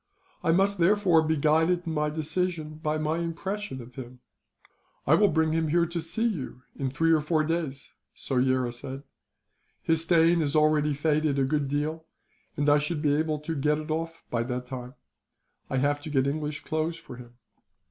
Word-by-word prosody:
I 165 - +3
must, 195 +3 +2
therefore, 180 -2 +4
be 160 0 0
guided 160 +4 +2
in 165 - -3
my 150 -1 0
decision 155 0 -3
by 155 0 0
my 155 +2 -1
impression 170 - -4
of 120 +2 -14
him." 125 -1 -9 0.9
"I 150 - +4
will 205 +5 +6
bring 160 -3 +2
him 160 -1 +1 0.2
to 170 0 -3
see 220 +8 -2
you, 145 - -3
in 135 -1 -2
three 165 +5 +1
or 160 -2 +4
four 155 +1 +1
days," 155 -4 -3 0.2
Soyera 130 -2 +1
said. 135 +2 -7 0.8
"His 160 -1 +2
stain 165 0 +4
is 145 -1 -1
already 150 -1 +3
faded 150 0 +1
a 135 - +3
good 145 +1 0
deal, 155 +3 -2 0.5
and 145 0 0
I 145 0 +6
shall 150 +3 -2
be 150 -1 +1
able 155 +1 0
to 160 +2 -3
get 150 +1 +1
it 155 +1 -5
off, 165 +1 -3
by 115 - 0
that 125 +1 -3
time. 125 0 -7 0.7
I 130 - -1
have 145 +2 +1
to 155 - -7
get 135 -3 +2
English 150 +1 -3
clothes 160 +1 -2
for 125 - -11
him. 120 -1 -13
155 Hz, 185 wpm, -27 LUFS, 140-165 Hz, 0.9 s, will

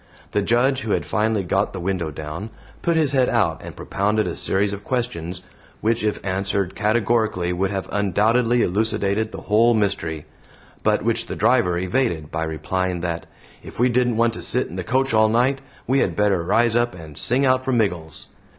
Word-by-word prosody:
The 105 - +1
Judge, 125 +6 +2
who 110 - -1
had 85 -5 -1
finally 105 +3 0
got 95 +3 0
the 95 - -5
window 90 -2 -2
down, 80 +7 -6 0.3
put 170 -1 +1
his 155 -4 +3
head 130 -3 +3
out 85 -9 +1
and - - -9
propounded 105 +2 0
a - - -3
series 100 +1 0
of 100 0 -7
questions, 90 -9 -3 0.4
which 110 0 +1
if 105 -1 0
answered 95 0 -1
categorically 105 -4 +1
would 95 +2 0
have 95 -1 -3
undoubtedly 115 +5 +2
elucidated 105 +1 0
the - - -8
whole 115 +3 +3
mystery, 95 -7 -1 0.6
but - - +1
which - - 0
the - - -5
driver 90 -1 +2
evaded 90 - -1
by 80 0 -2
replying 90 +3 -2
that 85 -1 -3 0.3
"if - - -12
we 125 +1 +4
didn't 120 -1 +1
want 115 0 +2
to - - -7
sit - - +1
in 85 - -9
the 95 - -3
coach 130 +6 0
all 110 0 +4
night, 130 +4 +2 0.2
we 135 +2 +2
had - - 0
better 100 -4 +2
rise 115 +5 +2
up 120 -2 +1
and 80 -4 -11
sing 130 - +1
out 130 0 +3
for 130 - -1
Miggles." 90 -10 -1
105 Hz, 190 wpm, -22 LUFS, 90-120 Hz, 0.6 s, we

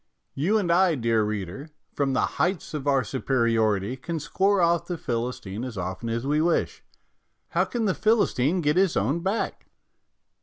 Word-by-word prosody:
You 185 +11 +1
and 185 -5 0
I, 175 -1 +4
dear 115 -3 +1
reader, 105 - -4 0.2
from 140 -2 0
the 130 - +2 0.2
heights 180 -2 -1
of 145 -2 -4
our 135 -2 +3
superiority, 115 -5 0
can 165 +5 -4
score 195 +7 +1
off 170 -1 +2
the 175 - -3
Philistine 115 -5 -4
as 125 -4 -6
often 95 +5 -4
as 115 +2 -2
we 150 +2 +2
wish. 170 +1 0 0.7
How - - +1
can 235 -2 -2
the 190 - +2
Philistine 185 - +2
get 150 +1 +1
his 190 -2 +3
own 125 - +1
back? 195 +6 -2
140 Hz, 165 wpm, -25 LUFS, 115-175 Hz, 0.7 s, I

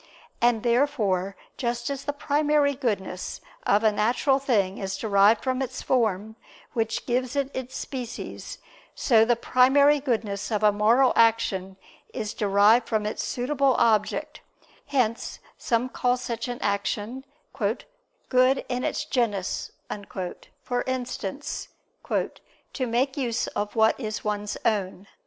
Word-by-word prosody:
And 235 -2 +3
therefore 230 -7 +1 0.2
just 240 -1 -2
as 275 -1 -5
the 290 - 0
primary 290 0 +2
goodness 205 -9 -3 0.3
of 205 +2 +4
a 220 - +5
natural 240 +6 +2
thing 205 -8 +1
is 195 0 -3
derived 205 +1 +4
from 260 0 0
its 260 -1 -4
form, 220 -3 0 0.4
which 225 -1 -1
gives 250 +1 -1
it 280 -1 0
its 260 0 -5
species, 250 -4 -6 0.4
so 225 -4 +4
the 240 +1 +3
primary 275 +5 +4
goodness 220 -7 -2
of 215 0 0
a 210 - +6
moral 225 +6 +4
action 195 -5 +2 0.4
is 215 0 -3
derived 210 +3 +4
from 215 -1 0
its 210 - -2
suitable 270 +1 +1
object: 215 -3 +1 0.5
hence 245 -5 0 0.2
some 235 0 0
call 250 -1 0
such 235 -2 -4
an 245 0 -4
action 205 +5 -2 0.3
"good 270 - -1
in 250 0 -2
its - - -1
genus"; 220 -10 -1 0.9
for 245 0 -1
instance, 255 -1 -4 0.4
"to 255 - -4
make 260 +4 0
use 240 -4 0
of 205 +2 -4
what 220 +2 +3
is 215 -4 -4
one's 210 -1 -2
own." 195 -3 0
235 Hz, 130 wpm, -26 LUFS, 210-260 Hz, 0.9 s, a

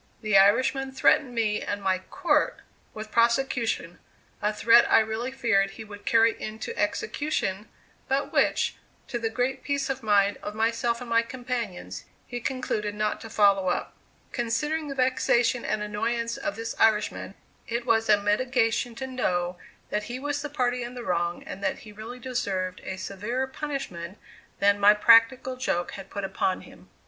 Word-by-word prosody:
The 215 -2 +1
Irishman 255 +7 +4
threatened 265 -1 +3
me 215 -2 +1
and 205 - -3
my 190 -2 0
"court" 350 - 0 0.3
with 215 0 -8
prosecution 235 -6 +1 0.4
a 210 +1 +1
threat 230 +2 +5
I - - +8
really 220 +3 -2
feared 225 -7 +2
he 225 - -7
would 205 -1 -12
carry 230 0 +4
into 220 - -5
execution, 290 - -2 0.4
but 270 +1 -1
which, - - +2 0.3
to 240 - -2
the 225 -1 -1
great 250 +3 -2
peace 280 -1 -1
of 265 0 -5
mind 205 -2 +3
of 210 - -6
myself 230 +2 0
and 245 - -7
my 230 0 +5
companions, 230 - -5 0.2
he 245 - -5
concluded 220 -5 -2
not 210 0 -1
to 225 - -8
follow 200 -3 +3
up. 180 - -1 0.4
Considering 300 +7 -1
the 275 - -5
vexation 255 -2 +2
and 210 - -1
annoyance 230 +3 -2
of 305 -1 -3
this 225 0 -4
Irishman, 210 -2 +1 0.3
it 235 +1 -2
was 225 -2 +2
a 210 -1 +6
mitigation 230 +2 +1
to 265 - -5
know 180 -9 -1 0.3
that 210 - -1
he 240 +2 -5
was 290 +2 -2
the 295 - -5
party 250 -3 0
in 240 +1 -6
the 245 - -6
wrong 175 -3 -1
and 195 - -8
that - - -1
he 215 - -10
really 220 +4 -8
deserved 195 -7 -3
a 190 - -5
severer 210 +8 -3
punishment 265 - -5 0.4
than 200 0 +3
my 205 +1 +7
practical 235 +4 +5
joke 175 -9 -1
had 195 -1 -9
put 200 - -5
upon 190 -1 -1
him. - - -16
230 Hz, 170 wpm, -26 LUFS, 205-255 Hz, 0.4 s, I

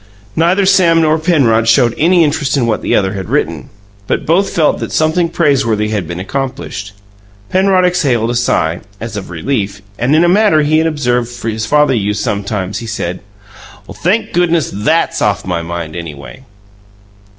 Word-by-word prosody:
Neither 180 +5 +2
Sam 170 -3 +4
nor 160 0 +2
Penrod 130 -10 +2
showed 120 0 +4
any 170 +2 +3
interest 150 -2 0
in 125 - +1
what 115 -2 -1
the - - 0
other 95 -2 +1
had 95 -3 -6
written; 80 -5 -2 0.4
but - - -1
both 180 +5 +2
felt 155 -3 +1
that - - -5
something 160 +2 +1
praiseworthy 130 -11 +1
had 105 -6 -2
been 85 +1 -5
accomplished. 105 -2 -5 0.6
Penrod 185 -1 +3
exhaled 135 -11 +1
a - - -2
sigh, 85 -8 0 0.2
as 115 -1 -6
of 100 -2 -6
relief, 100 +2 -3 0.2
and, 125 +6 +2
in 160 - +4
a - - +3
manner 185 -4 +4
he 155 +2 +2
had 160 - +1
observed 125 -5 -2
his 110 -1 -2
father 150 0 +3
use 105 -3 -1
sometimes, 100 -2 -3
he 115 - -7
said: 90 -5 -4 0.7
"Thank 205 +7 -1
goodness, 170 -2 +1
THAT'S 155 +12 0
off 105 -1 0
my 90 -2 -2
mind, 85 -1 -6
anyway!" 70 -7 -9
120 Hz, 170 wpm, -14 LUFS, 100-160 Hz, 0.7 s, Sam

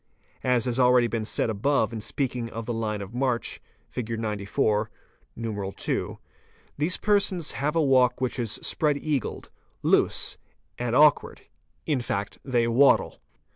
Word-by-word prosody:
As 125 -3 +2
has 125 0 -1
already 125 -1 +5
been 115 -2 -2
said 110 - 0
above 110 +1 +1
in 110 - -4
speaking 125 -1 -3
of 115 0 -6
the 120 - -3
line 105 -2 -2
of 100 +3 -11
march 125 -1 -1 0.3
(fig. 115 -2 -4
94, 105 0 0 0.5
I1.), 105 -4 -3 0.6
these 155 +6 0
persons 200 -6 +1
have 150 +3 -2
a 165 - +3
walk 130 -3 +3
which 130 0 -2
is 115 -3 0
spread 150 -2 +1
eagled, 145 -2 -3 0.3
loose, - - +2 0.4
and 120 -1 -1
awkward, 150 +1 +4 0.4
in 145 -5 0
fact 100 -4 -4
they 120 -3 +1
waddle. 130 +4 +3
120 Hz, 140 wpm, -26 LUFS, 110-140 Hz, 0.6 s, already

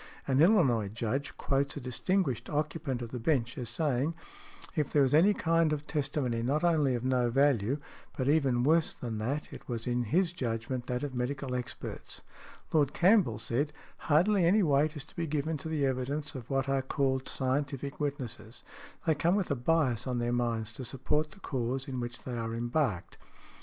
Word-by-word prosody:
An 135 +1 +3
Illinois 150 - +4
Judge 115 +6 -3
quotes 140 +1 0
a - - -2
distinguished 135 - -1
occupant 145 -4 -2
of 115 - -7
the 125 - -4
bench 125 -2 +1
as 120 -3 -4
saying, 145 +4 0 0.6
"if 150 -3 0
there 145 - +4
was 130 - +1
any 170 +7 +6
kind 165 -4 +2
of 150 -1 -2
testimony 135 -6 -1
not 140 +7 0
only 155 -7 +3
of 120 - -3
no 125 -2 +2
value, 135 -1 +2 0.4
but 130 - -1
even 135 -5 +3
worse 160 +3 +3
than 115 -3 -5
that, 135 +7 -3
it - - -11
was 115 -2 -3
in 120 0 0
his 175 - +1
judgment 120 -2 -3
that 125 +1 -2
of 145 -2 -3
medical 130 +1 -2
experts." 125 -1 -5 0.5
Lord 145 -3 +3
Campbell 180 - +4
said, 120 +7 -1 0.2
"Hardly 180 +6 +3
any 195 +5 +4
weight 150 0 +2
is 145 - -5
to 160 - -21
be 170 -3 -2
given 155 +2 -1
to 160 +3 -6
the 150 -3 +1
evidence 135 +3 -2
of 125 -4 -8
what 135 -1 0
are 135 0 +1
called 130 -1 0
scientific 140 +1 -2
witnesses: 140 -6 -4 0.4
they 160 - +4
come 170 +5 +2
with 195 -6 0
a - - +2
bias 130 -3 +1
on 125 -1 -1
their 120 0 0
minds 115 -2 -1
to 130 - -6
support 150 +5 -1
the 195 - -16
cause 130 -1 -2
in 130 -2 -4
which 120 0 -5
they 125 - -4
are 115 -1 -3
embarked". 120 - -1
135 Hz, 190 wpm, -30 LUFS, 120-155 Hz, 0.6 s, any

